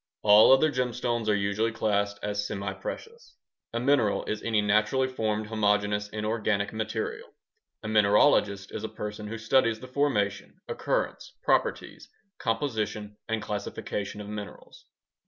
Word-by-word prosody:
All 105 Hz, +3 st, +8 dB
other 150 Hz, +4 st, +5 dB
gemstones 125 Hz, -3 st, -1 dB
are 105 Hz, -, +4 dB
usually 100 Hz, +3 st, 0 dB
classed 100 Hz, -2 st, 0 dB
as 105 Hz, 0 st, -1 dB
semiprecious. 100 Hz, -, -6 dB, 0.4 s
A 115 Hz, -, -2 dB
mineral 125 Hz, -5 st, +2 dB
is 105 Hz, -, -3 dB
any 110 Hz, -2 st, +1 dB
naturally 105 Hz, +5 st, +2 dB
formed 110 Hz, -4 st, -2 dB
homogeneous 105 Hz, -1 st, +1 dB
inorganic 105 Hz, -1 st, -1 dB
material. 435 Hz, -, -4 dB, 0.5 s
A -, -, -5 dB
mineralogist 105 Hz, -1 st, +3 dB
is 105 Hz, -, -5 dB
a 110 Hz, -, -3 dB
person 105 Hz, 0 st, -6 dB
who 115 Hz, +2 st, -5 dB
studies 110 Hz, 0 st, +2 dB
the 130 Hz, -, -9 dB
formation, 130 Hz, -7 st, -1 dB
occurrence, -, -, -2 dB
properties, -, -, 0 dB, 0.3 s
composition, 110 Hz, -4 st, -2 dB
and 110 Hz, -1 st, -1 dB
classification 105 Hz, 0 st, -4 dB
of 105 Hz, -, -8 dB
minerals. 105 Hz, -, -9 dB
110 Hz, 130 wpm, -27 LUFS, 105-115 Hz, 0.5 s, All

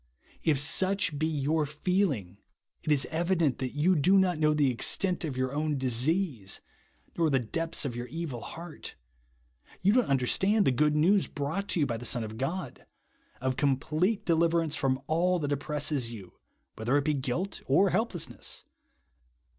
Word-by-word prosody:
If 150 Hz, -4 st, +2 dB
such 185 Hz, +1 st, +1 dB
be 155 Hz, +1 st, +1 dB, 0.2 s
3^our 155 Hz, 0 st, +1 dB
feeling, 150 Hz, -, -1 dB, 0.4 s
it 155 Hz, -, -2 dB
is 140 Hz, -2 st, +4 dB
evident 165 Hz, -4 st, +1 dB
that 130 Hz, 0 st, -4 dB
you 170 Hz, +6 st, +3 dB
do 180 Hz, +6 st, +4 dB
not 180 Hz, -4 st, +2 dB
know 155 Hz, -1 st, +3 dB
the 145 Hz, -3 st, +3 dB
extent 180 Hz, -, +1 dB
of 145 Hz, -5 st, -4 dB
your 130 Hz, +1 st, -1 dB
own 150 Hz, 0 st, -1 dB
disea.se, 130 Hz, -, 0 dB, 0.6 s
nor 165 Hz, -2 st, +2 dB
the 135 Hz, -, +3 dB
depths 160 Hz, +7 st, -2 dB
of 125 Hz, -4 st, -3 dB
your 120 Hz, +1 st, -5 dB
evil 160 Hz, -7 st, -5 dB
heart, 170 Hz, +3 st, -9 dB, 0.9 s
you 200 Hz, +2 st, +4 dB
don't 250 Hz, 0 st, +3 dB
understand 190 Hz, -, +2 dB
the -, -, +4 dB
good 150 Hz, +4 st, +2 dB
news 185 Hz, +6 st, +3 dB
brought 160 Hz, +7 st, -3 dB
to -, -, +1 dB
you -, -, +4 dB
by 120 Hz, -4 st, -2 dB
the 120 Hz, -, -8 dB
Son 120 Hz, 0 st, +2 dB
of 110 Hz, +1 st, -7 dB
God, 170 Hz, +8 st, -4 dB, 0.3 s
— 105 Hz, -, -34 dB
of 130 Hz, 0 st, -1 dB
complete 155 Hz, -, 0 dB
deliverance 165 Hz, -2 st, +2 dB
from 130 Hz, -2 st, 0 dB
all 180 Hz, +4 st, +1 dB
that 145 Hz, -4 st, -3 dB
oppresses 145 Hz, -3 st, -1 dB
you, 100 Hz, -6 st, -10 dB, 0.4 s
whether 120 Hz, +6 st, +1 dB
it 140 Hz, -, 0 dB
be 155 Hz, -, +2 dB
guilt 140 Hz, +8 st, -3 dB
or 185 Hz, +8 st, +4 dB
helplessness. 200 Hz, -8 st, -2 dB
150 Hz, 170 wpm, -29 LUFS, 130-175 Hz, 0.9 s, is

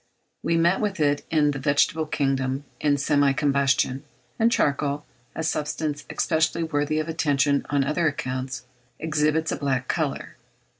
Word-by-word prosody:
We 165 Hz, -, +1 dB
meet 170 Hz, +3 st, +3 dB
with 205 Hz, -4 st, -2 dB
it 145 Hz, -1 st, +2 dB
in 150 Hz, -2 st, +3 dB
the 135 Hz, -, -4 dB
vegetable 145 Hz, +3 st, +2 dB
kingdom 135 Hz, -2 st, -1 dB, 0.2 s
in 145 Hz, -1 st, +2 dB
semi 140 Hz, 0 st, +3 dB
combustion; 135 Hz, -2 st, +1 dB, 0.4 s
and 230 Hz, +1 st, +4 dB
charcoal, 145 Hz, -4 st, 0 dB, 0.3 s
a 160 Hz, -, -3 dB
substance 150 Hz, -1 st, -2 dB
especially 160 Hz, +1 st, +1 dB
worthy 155 Hz, -1 st, -1 dB
of 155 Hz, 0 st, -1 dB
attention 145 Hz, -3 st, +1 dB
on 140 Hz, -1 st, +2 dB
other 155 Hz, +4 st, +1 dB
accounts, 130 Hz, -3 st, -3 dB, 0.3 s
exhibits 155 Hz, 0 st, 0 dB
a -, -, -2 dB
black 130 Hz, -3 st, -1 dB
colour. -, -, -2 dB
145 Hz, 145 wpm, -24 LUFS, 140-155 Hz, 0.4 s, and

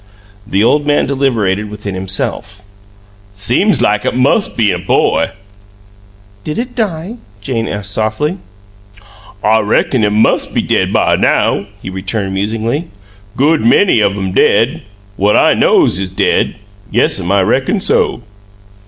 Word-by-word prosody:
The 100 Hz, -1 st, +1 dB
old 145 Hz, +5 st, +2 dB
man 145 Hz, -, +2 dB
deliberated 110 Hz, -8 st, -1 dB
within 105 Hz, -1 st, -6 dB
himself. 95 Hz, +2 st, -3 dB, 0.7 s
"Seem 120 Hz, -, +1 dB
like 105 Hz, 0 st, +1 dB
it -, -, -1 dB
mus' 140 Hz, -, +2 dB
been 110 Hz, -3 st, 0 dB
a -, -, -3 dB
boy." -, -, +1 dB, 1.1 s
"Did 150 Hz, -, -5 dB
it 245 Hz, +1 st, -4 dB
die?" 205 Hz, -2 st, -3 dB, 0.2 s
Jane 115 Hz, +2 st, -3 dB
asked, 100 Hz, 0 st, -4 dB
softly. 110 Hz, -, -1 dB, 1.0 s
"I 110 Hz, +1 st, +3 dB
reckon 110 Hz, +3 st, +1 dB
it 105 Hz, -, +3 dB
mus' 105 Hz, +2 st, +2 dB
be -, -, -2 dB
dead -, -, 0 dB
by -, -, +2 dB
now," -, -, +1 dB, 0.2 s
he 95 Hz, -, -6 dB
returned, 95 Hz, +1 st, -4 dB
musingly. 115 Hz, -, -2 dB, 0.5 s
"Good 155 Hz, +4 st, +2 dB
many 205 Hz, -, +4 dB
of 100 Hz, -1 st, +1 dB
'em 95 Hz, -1 st, -3 dB
dead: 115 Hz, -, +2 dB, 0.4 s
what 100 Hz, +2 st, +2 dB
I -, -, +4 dB
KNOWS 90 Hz, -, +3 dB
is 95 Hz, -1 st, -4 dB
dead. -, -, +1 dB, 0.4 s
Yes'm, 90 Hz, -1 st, +1 dB
I 100 Hz, -1 st, +3 dB
reckon 130 Hz, -, 0 dB
so." 195 Hz, -, 0 dB
110 Hz, 140 wpm, -14 LUFS, 100-145 Hz, 1.1 s, many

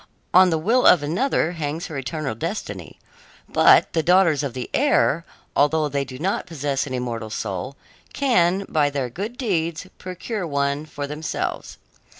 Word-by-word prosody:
On 185 Hz, 0 st, +7 dB
the 165 Hz, -, +1 dB
will 225 Hz, +11 st, +3 dB
of 165 Hz, -, +6 dB
another 170 Hz, -, 0 dB
hangs 160 Hz, +1 st, -4 dB
her 160 Hz, -, -7 dB
eternal 135 Hz, 0 st, -3 dB
destiny. 165 Hz, -, -5 dB, 0.5 s
But -, -, +5 dB
the 165 Hz, -, +2 dB
daughters 175 Hz, -3 st, +4 dB
of 140 Hz, -4 st, -4 dB
the 125 Hz, -, -4 dB
air, 140 Hz, +8 st, +2 dB, 0.3 s
although 150 Hz, +1 st, +2 dB
they 140 Hz, 0 st, -1 dB
do 130 Hz, -1 st, -9 dB
not 185 Hz, +8 st, -2 dB
possess 145 Hz, -3 st, -2 dB
an 130 Hz, -, -4 dB
immortal 120 Hz, -3 st, -4 dB
soul, 110 Hz, +4 st, -4 dB, 0.4 s
can, 195 Hz, -8 st, +2 dB
by 150 Hz, -2 st, +2 dB
their 135 Hz, -4 st, -3 dB
good 210 Hz, -, -5 dB
deeds, 170 Hz, -, -1 dB
procure 185 Hz, +1 st, -5 dB
one 140 Hz, +1 st, -1 dB
for 145 Hz, -2 st, -5 dB
themselves. 150 Hz, +2 st, -4 dB
155 Hz, 155 wpm, -22 LUFS, 140-180 Hz, 0.5 s, On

